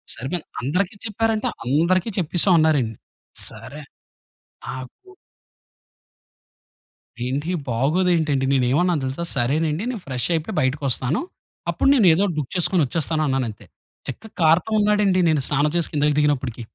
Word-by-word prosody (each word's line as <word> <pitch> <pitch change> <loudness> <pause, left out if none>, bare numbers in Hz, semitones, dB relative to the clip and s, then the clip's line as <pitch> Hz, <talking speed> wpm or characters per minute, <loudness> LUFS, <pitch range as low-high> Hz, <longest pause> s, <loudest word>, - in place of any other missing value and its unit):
సరిపోయింది. 140 +8 -4 0.2
అందరికి 180 - -1
చెప్పారంటే 220 0 0 0.2
అందరికీ 170 - +2
చెప్పేసాం 175 +2 +3
అన్నారండి. 140 -8 +2 0.5
సరే. 125 +7 -10 0.9
నాకు 135 - -9 2.1
ఏంటి 145 +7 -2 0.2
బాగోదు 150 +11 +1
ఏంటండి. 145 -5 +1
నేను 130 -2 +2
ఏన్నావను 170 0 +2
తెలుసా? 135 +6 -3
సరేనండి 150 - 0
నేను 230 - -5
ఫ్రెష్ 130 -2 -2
అయిపోయి 160 - -3
బయటికొస్తాను. 135 +1 0 0.5
అప్పుడు - - +2
నేను 215 -8 +5
ఏదో 180 - +1
ఒకటి 175 -5 -2
బుక్ 135 - -5
చేసుకొని 180 0 +2
ఒచ్చేస్తాను 155 +2 -1
అన్నానంతే 125 -6 -2 0.4
చక్కగా 220 0 -7
కార్‌తో 165 +7 +3
ఉన్నాడండి 205 -3 +3
నేను 150 -3 +2
స్నానం 150 +2 +1
చేసి 170 - -1
కిందకి 150 0 +2
దిగినప్పటికి. 130 -5 0
155 Hz, 125 wpm, -22 LUFS, 135-180 Hz, 2.1 s, నేను